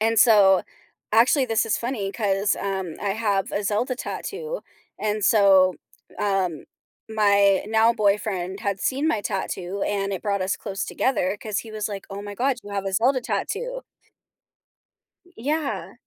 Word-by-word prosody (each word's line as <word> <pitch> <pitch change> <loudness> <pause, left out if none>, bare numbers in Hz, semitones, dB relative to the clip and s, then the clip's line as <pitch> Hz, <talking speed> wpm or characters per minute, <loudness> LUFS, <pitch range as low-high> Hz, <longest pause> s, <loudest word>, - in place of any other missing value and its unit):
and 225 0 +2
so 200 -6 +6 0.5
actually, 245 +5 +5
this 225 0 +1
is 210 - +1
funny 235 -5 -3
'cause, 200 -2 +1
um, 190 -4 -3
I 200 - 0
have 205 -2 0
a 200 - -1
Zelda 225 +6 0
tattoo. 470 - -5 0.4
And 210 -1 -1
so, 195 -4 +5 0.4
um, 190 -5 -1 0.4
my 200 -3 +3
now-boyfriend 210 -4 +1
had 200 -3 -2
seen 275 +4 0
my 220 -10 +1
tattoo 195 -1 -3
and 200 -1 -1
it 190 - -3
brought 200 -3 0
us 185 - 0
close 200 -1 -4
together 205 -7 0
'cause 215 -2 -2
he 225 - -11
was 215 0 -3
like, 200 -2 -6
"Oh 200 +1 -5
my 205 0 -7
god, 260 +3 +1
you 205 - -10
have 195 0 -2
a 195 - -2
Zelda 255 +5 +3
tattoo." 440 - -3 1.5
Y 355 - -22
yeah. 295 +4 -2
205 Hz, 155 wpm, -24 LUFS, 195-230 Hz, 1.5 s, so